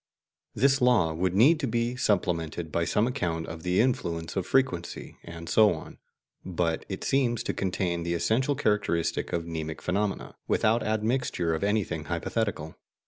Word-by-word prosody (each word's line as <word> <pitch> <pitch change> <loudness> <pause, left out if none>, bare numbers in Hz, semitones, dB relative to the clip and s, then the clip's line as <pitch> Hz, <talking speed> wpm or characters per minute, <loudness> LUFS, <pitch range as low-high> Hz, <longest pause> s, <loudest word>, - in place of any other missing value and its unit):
This 135 +4 +3
law 110 -10 +4
would 90 +3 -1
need 145 +10 +6
to 140 - -1
be 120 +1 -1
supplemented 85 -8 -1
by 85 +1 0
some 105 +6 +2
account 85 -9 -2
of 80 0 -8
the 90 +2 +1
influence 85 -10 0
of 95 -2 -2
frequency, 95 -11 -1
and 85 0 -9
so 105 -1 +5
on; 80 - -11 0.4
but 85 -3 -1
it 95 - -5
seems 125 -4 +1
to - - -2
contain 90 -2 -1
the 85 +1 -1
essential 130 - +1
characteristic 105 - 0
of 85 -1 -2
mnemic 80 -1 -5
phenomena, 100 +2 -2
without 115 +2 +2
admixture 110 -5 0
of 80 - -2
anything 100 -7 0
hypothetical. 85 -1 -2
95 Hz, 155 wpm, -27 LUFS, 85-115 Hz, 0.4 s, need